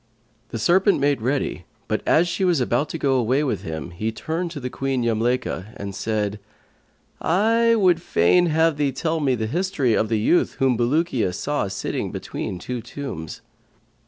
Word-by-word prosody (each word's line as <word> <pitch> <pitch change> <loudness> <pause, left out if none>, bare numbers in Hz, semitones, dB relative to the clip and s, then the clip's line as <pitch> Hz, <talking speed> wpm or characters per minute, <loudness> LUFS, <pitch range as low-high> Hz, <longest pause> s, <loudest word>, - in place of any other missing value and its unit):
The - - -4
serpent 185 - +3
made 140 -3 +1
ready, 125 -7 -1 0.2
but 110 -1 -1
as 170 +3 +4
she 190 - -2
was 175 -5 +3
about 125 +4 0
to - - -4
go 135 -4 +2
away 130 +4 +2
with 140 - -1
him, 80 +1 -6
he 105 +6 -3
turned 165 +9 -3
to 145 -6 -5
Queen 135 -2 -1
Yamlaykha 115 -2 -1
and 100 -1 -6
said, 105 0 -2 0.8
"I 230 +6 +3
would 180 -6 +3
fain 175 - +3
have 160 -1 +2
thee 145 -2 +1
tell 160 +4 -1
me 135 -4 +2
the 110 -2 -2
history 155 - 0
of 110 0 +1
the 115 - +1
youth 115 +11 +2
whom 130 -2 +2
Bulukiya 120 - +1
saw 145 -8 -1
sitting 95 - -3
between 90 - -5
two 120 +7 -5
tombs." 120 - -7
135 Hz, 170 wpm, -23 LUFS, 110-165 Hz, 0.8 s, as